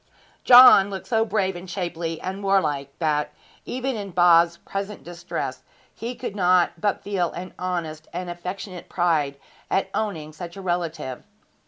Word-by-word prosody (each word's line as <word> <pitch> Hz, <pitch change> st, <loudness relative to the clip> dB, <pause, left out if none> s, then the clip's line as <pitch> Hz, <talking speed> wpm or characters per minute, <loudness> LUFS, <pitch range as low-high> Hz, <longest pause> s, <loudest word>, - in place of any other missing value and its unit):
John 245 Hz, -6 st, +9 dB
looked 195 Hz, -1 st, -6 dB
so 225 Hz, -2 st, +2 dB
brave 195 Hz, -3 st, 0 dB
and 175 Hz, +1 st, -9 dB
shapely 170 Hz, -3 st, -3 dB
and 190 Hz, +2 st, -5 dB
warlike 150 Hz, -8 st, +1 dB
that, 150 Hz, -3 st, 0 dB, 0.3 s
even 260 Hz, +1 st, -3 dB
in 205 Hz, -2 st, -5 dB
Bob's 170 Hz, -1 st, +5 dB
present 200 Hz, +3 st, -6 dB
distress, 175 Hz, 0 st, -5 dB, 0.3 s
he 240 Hz, +2 st, -6 dB
could 240 Hz, -5 st, -6 dB
not 180 Hz, -2 st, +3 dB
but 205 Hz, -2 st, 0 dB
feel 190 Hz, -4 st, -1 dB
an 180 Hz, +1 st, -7 dB
honest 165 Hz, -4 st, -4 dB
and 180 Hz, +1 st, -5 dB
affectionate 180 Hz, +1 st, -7 dB
pride 160 Hz, -6 st, +1 dB, 0.3 s
at 195 Hz, -, 0 dB
owning 165 Hz, -8 st, -3 dB
such 170 Hz, +3 st, -8 dB
a -, -, -7 dB
relative. 170 Hz, -7 st, -3 dB
180 Hz, 150 wpm, -24 LUFS, 170-195 Hz, 0.3 s, John